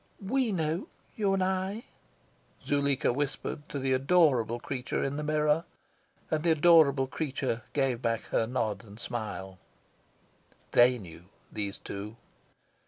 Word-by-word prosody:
"WE 240 +4 0
know, 165 0 -1 0.3
you 205 -3 +1
and 190 - +1
I," 190 +4 -1 0.8
Zuleika 140 -3 +1
whispered 145 +2 -3
to - - -4
the 135 -1 +1
adorable 130 -5 +3
creature 125 0 -3
in 135 +1 -2
the 150 - -3
mirror; 150 +1 +2 0.7
and 155 -1 +1
the 170 - +1
adorable 155 -4 +5
creature 130 -4 -2
gave 135 -4 +1
back 115 -2 0
her 115 - +1
nod 115 -3 -2
and 105 0 -13
smile. 100 -6 -5 1.1
THEY 125 +1 +6
knew, 85 -5 -12 0.3
these 100 -2 -3
two. 100 +3 -7
140 Hz, 130 wpm, -29 LUFS, 115-160 Hz, 1.1 s, THEY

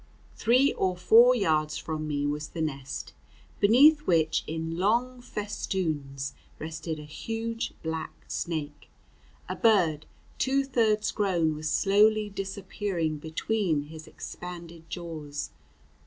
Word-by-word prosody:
Three 255 +5 +4
or 185 -1 0
four 235 +7 +7
yards 155 -8 +1
from 155 -1 -4
me 145 -1 -1
was 150 +1 -2
the 165 - -5
nest, 140 -3 -5 0.5
beneath 290 +8 +6
which, 160 -2 +2
in 160 +1 -3
long 240 +6 +1
festoons, 165 - -3 0.2
rested 160 0 -5
a 150 - -8
huge 225 +9 -4
black 160 0 -5
snake; 150 -4 -4 0.6
a - - -3
bird 175 -9 +3 0.3
two 275 +1 +2
thirds 225 -5 +1
grown 175 -6 +1
was 155 0 -3
slowly 210 +6 +4
disappearing 195 -4 -3
between 160 0 -1
his 160 0 -10
expanded 170 -2 -9
jaws. 155 -5 -5
170 Hz, 115 wpm, -28 LUFS, 155-215 Hz, 0.6 s, four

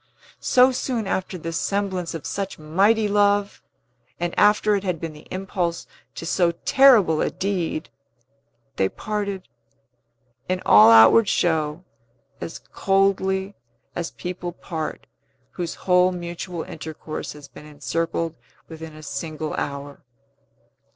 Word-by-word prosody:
So 255 +1 +5
soon 245 -3 -2
after 190 -1 -2
the 165 0 -5
semblance 190 -1 -2
of 160 - -7
such 195 -1 -4
mighty 200 +8 +2
love, 205 0 +2 0.6
and 175 0 -2
after 210 0 +4
it 200 - -2
had 180 -4 -2
been 165 -1 -5
the 150 - -15
impulse 180 -2 -3 0.3
to - - -6
so 175 0 +2
terrible 230 - +6
a - - +1
deed, 185 -5 -3 0.9
they 95 - +2
parted, 200 -3 -4 1.0
in 185 0 0
all 105 +2 +8
outward 115 - +7
show, 160 -1 0 0.6
as 165 - -5
coldly 195 0 0 0.4
as 170 -1 -3
people 180 -1 -6
part 160 -2 -5 0.5
whose 175 -2 -4
whole 180 0 +4
mutual 175 -1 -5
intercourse 155 -2 -7
has 150 -1 -12
been 145 +3 -13
encircled 165 +2 -2 0.3
within 160 -1 -9
a 155 - -12
single 155 0 -5
hour. 140 0 -5
175 Hz, 125 wpm, -23 LUFS, 160-195 Hz, 1.0 s, all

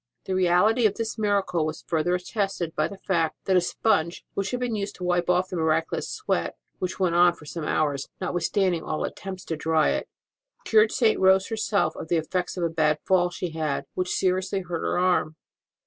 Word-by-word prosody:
The 190 - -2
reality 185 +6 +4
of 205 - -4
this 225 -1 -4
miracle 200 -5 +1
was 155 +1 -4
further 170 +2 0
attested 180 -3 -2
by 155 - +1
the 200 - -10
fact 170 -5 0
that 190 - +2
a 180 - +5
sponge 170 -3 0
which 195 -1 -2
had 250 - -2
been 245 -2 -2
used 205 -1 -3
to 180 - -9
wipe 175 -1 +1
off 180 +1 +2
the 185 - -5
miraculous 160 0 0
sweat 425 - -2 0.2
(which 185 +1 -3
went 180 -3 +2
on 175 0 +5
for 150 - -15
some 155 +1 -5
hours, 145 -4 0
notwithstanding 180 0 0
all 155 - -3
attempts 190 -2 -6
to 165 - -3
dry 160 - +2
it) 70 -1 -2 0.6
cured 215 0 +4
St. 225 -4 +2
Rose 190 0 +4
herself 220 -2 0
of - - -7
the 170 - +2
effects 180 +4 -2
of 175 - -1
a - - +3
bad 155 -2 +2
fall 180 -2 +3
she 175 0 -5
had, 155 -3 -2
which 180 0 -2
seriously 185 +1 0
hurt 175 -2 -4
her - - -1
arm. 180 -3 +1
180 Hz, 205 wpm, -25 LUFS, 165-195 Hz, 0.6 s, a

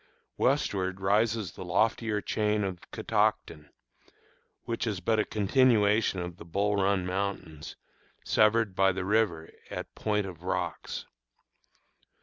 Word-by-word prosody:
Westward 95 -9 0
rises 105 0 +1
the - - -9
loftier 105 +3 +1
chain 105 0 0
of 95 -3 -4
the - - -17
Catoctin, 75 -1 -1 0.9
which 115 0 -3
is 105 -4 -2
but 110 +3 +1
a - - +4
continuation 105 -2 +3
of 90 -1 -5
the - - -10
Bull 100 +5 0
Run 95 -1 +1
Mountains, 90 -5 -4 0.5
severed 110 -1 +3
by 95 0 +4
the 95 0 -3
river 100 -6 +1 0.2
at - - -6
Point 105 -2 -1
of 90 -4 -9
Rocks. 95 - -3
100 Hz, 130 wpm, -29 LUFS, 95-110 Hz, 0.9 s, a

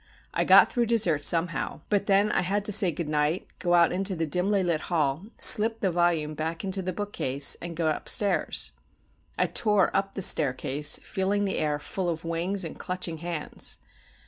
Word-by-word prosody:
I - - 0
got - - +6
through 240 -2 0
dessert 185 -11 +1
somehow; 170 +2 -1
but 205 -1 0
then 200 +1 +2
I - - +1
had 200 +3 -2
to 210 - -1
say 195 -2 +4
good 165 +1 -5
night, 150 +3 -1
go 175 -1 +1
out 170 -1 +4
into 190 +1 -1
the 165 -1 -2
dimly 185 +5 0
lit 170 -3 -1
hall, 155 +1 -1
slip 225 +1 +7
the 190 - -1
volume 170 -3 0
back 160 +2 -5
into 190 0 -2
the 185 0 -4
bookcase, 155 -8 +1
and 170 -1 -7
get 160 -2 0
upstairs. 205 -2 0 0.7
I - - +2
tore 210 -4 0
up 195 0 -1
the 195 - -3
staircase, 145 -3 +1
feeling 205 +1 -2
the 195 - -2
air 150 -1 -1
full 180 +4 -4
of 165 0 -5
wings 175 +3 -3
and 160 - -9
clutching 180 -3 -4
hands. 170 -2 -5
175 Hz, 185 wpm, -26 LUFS, 160-195 Hz, 0.7 s, slip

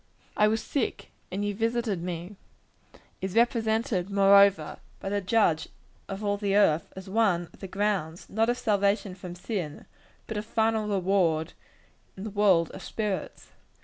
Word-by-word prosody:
"I 210 - +4
was 220 +1 0
sick 275 -5 -3 0.2
and 200 +3 -2
ye 205 - -1
visited 225 -3 -1
me," 175 +2 -5 0.9
is 190 +1 -4
represented, 225 -4 +1
moreover, 200 0 +5 0.2
by 195 - -4
the 205 0 0
Judge 185 -5 +2 0.4
of 195 +1 -5
all 205 0 0
the 200 -1 0
earth, 165 -6 +3
as 190 0 -9
one 190 -5 +1
of - - -18
the 195 - -6
grounds 190 -4 -2
not 225 +3 +1
of 245 - +1
salvation 200 -3 +1
from 180 -1 -8
sin 180 -5 -5 0.4
but 220 - -5
of 210 - -3
final 220 -1 +1
reward 180 -5 +1 0.6
in 190 - -7
the 215 - -5
world 195 -5 +3
of - - -9
spirits. 210 -3 -4
200 Hz, 155 wpm, -27 LUFS, 185-220 Hz, 0.9 s, moreover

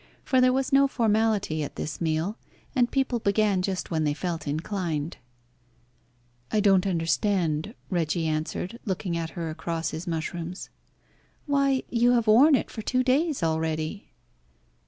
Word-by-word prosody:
For 260 -1 +3
there 255 0 +5
was 265 +1 -1
no 275 0 +6
formality 220 - +1
at 145 - -5
this 150 - -5
meal, 165 +5 0 0.4
and 245 -2 +3
people 265 -3 0
began 205 -2 +2
just 185 -1 -3
when 160 -1 +1
they 145 -1 0
felt 165 -3 -4
inclined. 160 0 -2 1.3
"I 215 - +2
don't 195 -2 +4
understand," 170 +1 0 0.2
Reggie 170 -1 0
answered, 160 +7 -3
looking 185 -3 -2
at 165 -1 -2
her 165 -2 -3
across 165 0 -3
his 165 +4 -6
mushrooms. 170 +2 -4 0.7
"Why, 275 -2 +2
you 240 +1 +4
have 235 -2 +2
worn 260 +8 +6
it - - -2
for 220 - -6
two 255 +4 +1
days 280 - +1
already." 160 +3 -2
185 Hz, 145 wpm, -26 LUFS, 160-235 Hz, 1.3 s, no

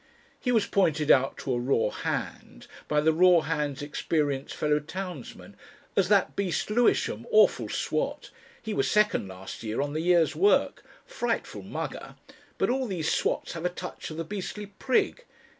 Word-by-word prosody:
He 250 - -1
was 225 -4 +3
pointed 160 -6 +2
out 135 +1 +3
to 130 - -2
a 120 - 0
raw 125 -1 +1
hand, - - -5 0.2
by 150 0 +2
the 160 +1 +3
raw 180 0 +6
hand's 150 -3 -2
experienced 145 -2 -1
fellow 150 0 +1
townsman, 175 -2 -8 0.4
as - - +2
"that - - +3
beast 195 0 -1
Lewisham 240 +3 +1
awful 440 -2 +4
swat. - - -2 0.3
He 220 -1 -5
was - - +1
second 210 - +2
last 95 0 -9
year 110 -1 -3
on 145 +1 -1
the 155 - -1
year's 170 -1 +3
work. 405 +2 +2 0.2
Frightful - - -3
mugger. - - -6 0.4
But - - +1
all 260 0 -1
these 175 -6 -1
swats - - -1
have 165 -1 -6
a 180 - +1
touch 180 0 -7
of 155 - -7
the 165 - -2
beastly 205 +3 -5
prig. 250 - 0
165 Hz, 165 wpm, -27 LUFS, 145-200 Hz, 0.4 s, raw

